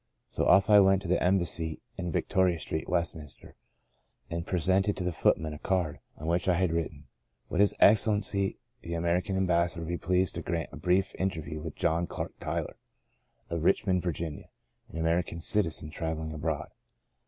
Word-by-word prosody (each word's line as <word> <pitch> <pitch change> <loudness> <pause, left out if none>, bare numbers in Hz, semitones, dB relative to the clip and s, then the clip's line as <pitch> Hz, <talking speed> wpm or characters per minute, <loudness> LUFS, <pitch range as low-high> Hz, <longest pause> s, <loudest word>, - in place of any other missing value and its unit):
So - - -1
off 95 0 +6
I 105 -1 +7
went 95 0 +4
to - - -5
the 90 - +1
Embassy 85 -3 +1 0.2
in 90 -2 -4
Victoria 90 0 +1
Street, 80 - -4
Westminster, 80 -4 -2 0.8
and 85 +1 -3
presented 95 +3 +1
to 95 - -3
the 90 - 0
footman 80 -1 +1
a 75 - -8
card, 90 -6 -1 0.2
on 80 - -8
which 85 +3 0
I 90 - +4
had 90 -1 +1
writ 85 -1 0
ten 75 -2 -16
— - - -50
* - - -44
Would 90 - -2
His 100 0 +4
Excellency 100 -2 +3 0.2
the 85 0 -5
American 85 +3 0
Ambassador 85 -2 +1
be 85 +1 -3
pleased 90 +1 +1
to - - -4
grant 85 -1 -3
a - - -7
brief 90 +4 +1
inter 95 -4 -1
view 80 0 -6
to 80 - -4
John 85 +2 0
Clark - - -5
Tyler, - - -3 0.7
of 85 -2 -2
Richmond, 90 0 +2
Vir 85 -1 -1
ginia, 80 -2 -5 0.4
an - - -8
American 85 +1 0
citizen 85 -6 +1
travelling 80 -1 -4
abroad? 75 -1 -3
85 Hz, 185 wpm, -29 LUFS, 80-95 Hz, 0.8 s, I